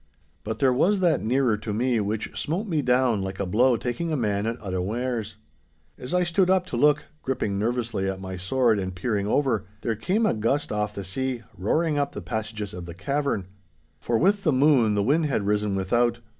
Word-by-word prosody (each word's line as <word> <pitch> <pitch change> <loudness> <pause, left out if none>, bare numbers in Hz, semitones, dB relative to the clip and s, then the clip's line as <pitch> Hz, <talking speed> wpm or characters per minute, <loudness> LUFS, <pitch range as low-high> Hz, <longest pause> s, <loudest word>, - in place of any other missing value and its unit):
But 110 +1 -4
there 130 -2 +3
was 190 +10 +3
that 175 -3 +2
nearer 120 -1 +2
to 105 +1 -5
me 120 +2 +1
which 105 +1 -3
smote 175 +8 -2
me 165 -7 0
down 125 -5 +2
like 95 0 -5
a 100 - 0
blow 120 +6 +3
taking 160 +9 -3
a 155 - 0
man 105 -3 0
at 115 +2 -3
unawares. 110 +3 -3 0.6
As 125 - -8
I 180 0 +3
stood 180 +2 +2
up 185 -1 +3
to - - -4
look, 150 +4 +3 0.2
gripping 105 -7 -2
nervously 115 -3 -1
at 95 -1 -4
my 95 0 -6
sword 110 +4 +2
and 95 -1 -4
peering 100 +1 -1
over, 115 -5 +1
there 115 - -1
came 190 - 0
a - - +3
gust 115 +7 0
off 105 0 -2
the 100 - -4
sea, 125 +5 -3
roaring 150 - +1
up 140 0 -1
the - - -6
passages 105 +2 -4
of 90 -1 -7
the 85 - -8
cavern. 135 0 -1 0.5
For 115 +8 0
with 195 - +2
the 155 - +3
moon 130 -6 +4
the 100 - +2
wind 150 +7 +2
had 115 -8 -1
risen 105 -1 +1
without. 120 +5 +1
115 Hz, 205 wpm, -25 LUFS, 105-140 Hz, 0.6 s, moon